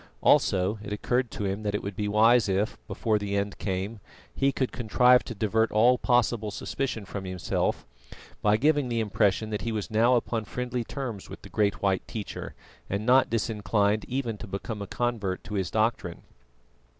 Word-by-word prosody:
Also 95 +3 +3
it 105 - -8
occurred 125 +4 0
to 105 - -4
him 100 +2 -2
that 105 -1 -2
it - - -3
would 100 -1 -5
be 105 +1 -2
wise 110 +2 +4
if, 100 +4 0
before 110 -2 0
the 100 -1 -3
end 100 0 -2
came, 100 +3 -3 0.3
he 135 0 +2
could 130 -1 -1
contrive 125 +1 +4
to 115 - -7
divert 110 +2 +1
all 120 +4 +4
possible 120 -3 +2
suspicion 110 +1 -3
from 100 0 -6
himself, 90 -4 -2 0.6
by 105 0 +4
giving 145 +1 +2
the 115 -1 0
impression 105 -1 +1
that 105 -2 -2
he 115 - -2
was 110 0 -4
now 115 +3 +4
upon 115 -1 -1
friendly 125 +2 -3
terms 120 -6 -6
with - - -10
the - - -10
great 100 -2 0
white 95 -1 +1
teacher 105 -3 -6 0.3
and 100 +2 -2
not 130 +2 +5
disinclined 105 -2 0
even 120 -5 -3
to - - -8
become 100 +2 -5
a 100 - -5
convert 110 -6 -2
to 105 - -8
his 95 -3 -1
doctrine. 110 -6 -1
110 Hz, 185 wpm, -27 LUFS, 100-120 Hz, 0.6 s, not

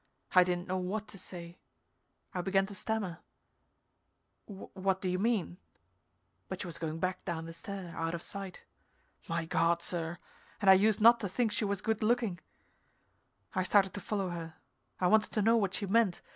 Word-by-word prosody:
I 185 - +8
didn't 180 0 -2
know 185 0 -1
what 205 +4 -3
to 195 - -9
say. 175 -1 -8 0.7
I 180 - -1
began 195 +1 +2
to 200 - -7
stammer, 200 -4 -2 1.3
"What 190 -1 -3
do 190 - -3
you 180 0 0
mean 200 -5 0 0.4
" - - -45
but - - -4
she - - -4
was 170 -3 -5
going 160 -1 -3
back 185 +2 -2
down 165 -3 -3
the 165 - -7
stair, 180 0 -7
out 165 +1 -2
of 170 - -6
sight. 195 -2 -6 0.7
My 165 0 -1
God 170 +1 +2
sir, 170 -1 -1 0.4
and 195 -2 +6
I - - +11
used 210 +2 +3
not 235 +2 +8
to 200 - -3
think 225 +3 0
she 210 +1 +1
was 200 -1 -2
good 220 -1 0
looking! 220 -5 +1 1.1
I 185 - +1
started 195 0 +3
to 205 - -5
follow 195 -1 -2
her. 165 -2 -6 0.4
I 185 - +1
wanted 215 +4 +3
to 215 - +1
know 225 +2 +5
what 200 -4 +1
she 205 - -1
meant. 200 -2 +2
190 Hz, 185 wpm, -32 LUFS, 175-205 Hz, 1.3 s, I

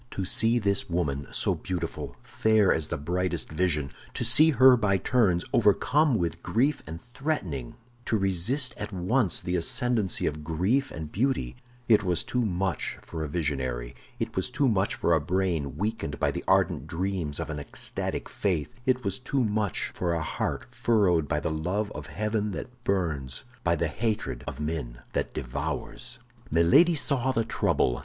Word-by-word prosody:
To 95 - -3
see 115 +5 +3
this 100 -4 0
woman, 70 -6 -1
so - - 0
beautiful, 90 -2 -4
fair 110 -3 +3
as 80 -2 -1
the - - -3
brightest 90 +2 -2
vision, 75 -5 0 0.2
to - - -1
see 155 +1 +8
her 130 -2 +7
by 105 -5 +2
turns 95 -4 +2
overcome 125 +6 +3
with 85 -2 -2
grief 135 +7 +1
and 80 +2 -6
threatening; 110 - -3 0.3
to 110 - +1
resist 100 - +2
at - - -5
once 95 +2 +1
the 90 - -2
ascendancy 110 - +1
of 75 +1 -2
grief 95 - +1
and 80 -2 -7
beauty—it 120 - 0
was 90 -3 0
too 125 -1 -1
much 95 - -1
for 80 - -5
a - - -3
visionary; 65 -7 -2 0.2
it - - -4
was 95 +7 0
too 135 +2 +1
much 100 -4 +1
for 85 - +1
a 80 - +3
brain 85 -5 -1
weakened 105 -6 -3
by - - +2
the - - -5
ardent 70 - +2
dreams 85 -3 -2
of - - -3
an 75 - -4
ecstatic 70 - -2
faith; 90 -1 -2
it 130 -1 +2
was 100 -2 -2
too 130 +1 0
much 105 -3 -1
for 85 -2 -1
a 80 - -1
heart - - -3
furrowed 95 -9 +2
by - - 0
the - - -2
love 90 +7 -2
of - - -7
heaven 105 0 -1
that 125 +3 -8
burns, 80 - -1 0.2
by - - +2
the - - 0
hatred 110 0 -2
of - - -5
men 75 -6 -4
that - - -1
devours. 75 - -4 0.3
Milady 85 - +5
saw 135 -3 +1
the 115 -3 0
trouble. 60 - +1
95 Hz, 170 wpm, -27 LUFS, 80-115 Hz, 0.3 s, see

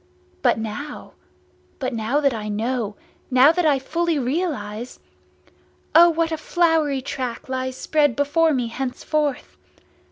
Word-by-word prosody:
_ - - -37 0.4
But - - +3
now—but 255 +2 -8
now 230 +5 0
that 275 -3 +2
I 215 -2 -5
know, 220 0 -2 0.3
now 260 +3 +6
that 340 -1 +1
I 285 -2 +4
fully 330 +4 -1
realise! 250 - -3 1.0
O 345 +1 +8
what 330 0 0
a 320 - -1
flowery 315 -5 +1
track 255 0 -5
lies 260 0 -3
spread 290 -5 +1
before 315 +3 +2
me, 255 -4 0
henceforth! 270 +3 -2
275 Hz, 130 wpm, -22 LUFS, 245-310 Hz, 1.0 s, O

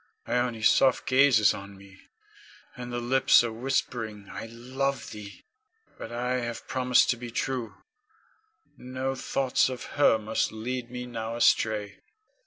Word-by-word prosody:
Ione's 120 -2 +1
soft 130 -2 +3
gaze 135 -1 +5
is 110 - +4
on 100 0 -9
me, 95 -1 -16 0.7
and 125 -1 -7
the 120 - -3
lips 120 +1 +4
are 115 -2 -3
whispering, 115 -4 -3
"I - - -6
love 130 +4 -3
thee!" 105 -1 -10 0.5
But 115 - -7
I 125 +2 -1
have 120 -1 -5
promised 125 -1 +3
to 120 - -2
be 120 0 -7
true, 125 0 -3 1.0
no 130 +1 -4
thoughts 130 0 +1
of 125 -2 -6 0.2
her 145 - +6
must 110 +1 -1
lead 120 +2 -4
me 125 0 -6
now 115 -1 -5
astray. 110 -3 +1
120 Hz, 145 wpm, -27 LUFS, 110-130 Hz, 1.0 s, her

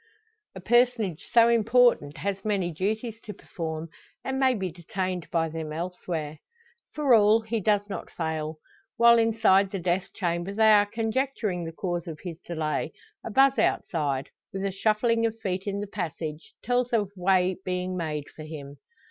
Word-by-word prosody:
A - - -6
personage 230 -4 +1
so 230 -1 +6
important 230 -9 +3
has 195 -1 -3
many 195 -5 0
duties 220 +6 -3
to 210 - -8
perform, 160 -2 -6 0.3
and 265 0 -2
may 260 -1 +3
be 190 -4 -3
detained 180 +1 -4
by 165 -1 +1
them 160 -1 -5
elsewhere. 165 -2 -4 0.6
For 290 -4 +3
all, 215 0 +6
he 225 +1 -2
does 205 0 +1
not 205 - -6
fail. 160 -1 -3 0.4
While 235 0 +7
inside 220 -4 +4
the 195 - -4
death 180 +1 -1
chamber 175 +2 -2
they 220 0 +5
are 205 -1 +5
conjecturing 225 -4 -2
the 165 - -5
cause 175 0 -3
of 160 -2 -7
his 175 -2 -7
delay, 155 -3 -3 0.3
a - - -5
buzz 270 +4 +4
outside, 140 -5 0 0.2
with 195 -1 -3
a 195 - 0
shuffling 220 +4 +1
of 225 0 -6
feet 190 -1 -3
in 200 0 -2
the - - -3
passage, 165 -5 -6
tells 245 0 0
of 205 -4 +1
way 185 0 +2
being 185 0 -2
made 155 -4 -3
for - - -10
him. 145 -2 -8
190 Hz, 165 wpm, -27 LUFS, 165-220 Hz, 0.6 s, While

